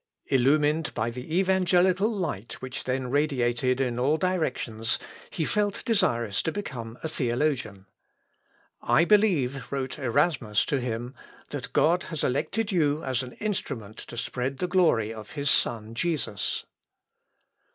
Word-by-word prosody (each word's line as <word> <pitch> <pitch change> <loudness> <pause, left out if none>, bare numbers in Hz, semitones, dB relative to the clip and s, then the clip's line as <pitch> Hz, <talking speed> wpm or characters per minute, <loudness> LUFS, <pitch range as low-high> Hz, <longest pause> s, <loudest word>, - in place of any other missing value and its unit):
Illumined 150 +4 +2
by 115 +2 0
the 125 +7 -5
evangelical 190 +1 +3
light 120 - -3
which 130 +1 -6
then 130 -1 -1
radiated 130 -3 +1
in 125 -3 0
all 145 +5 +3
directions, 130 -11 0 0.3
he 160 - -2
felt 205 +2 0
desirous 120 - +1
to 160 - -1
become 120 - -6
a - - 0
theologian. 120 -7 -1 1.0
"I 170 - +4
believe," 145 - +2
wrote 135 +1 -3
Erasmus 125 -5 +1
to 140 - 0
him, 120 0 -3 0.4
"that - - -5
God 175 +3 +3
has 160 -4 -3
elected 190 - 0
you 155 -4 +2
as 130 -1 0
an 125 -1 -7
instrument 130 - -4
to 120 - -9
spread 130 +3 -2
the 180 - -1
glory 160 - +3
of 110 -2 -10
his 145 -1 +1
Son 110 -1 +1
Jesus." 120 - -1
135 Hz, 135 wpm, -27 LUFS, 120-170 Hz, 1.0 s, I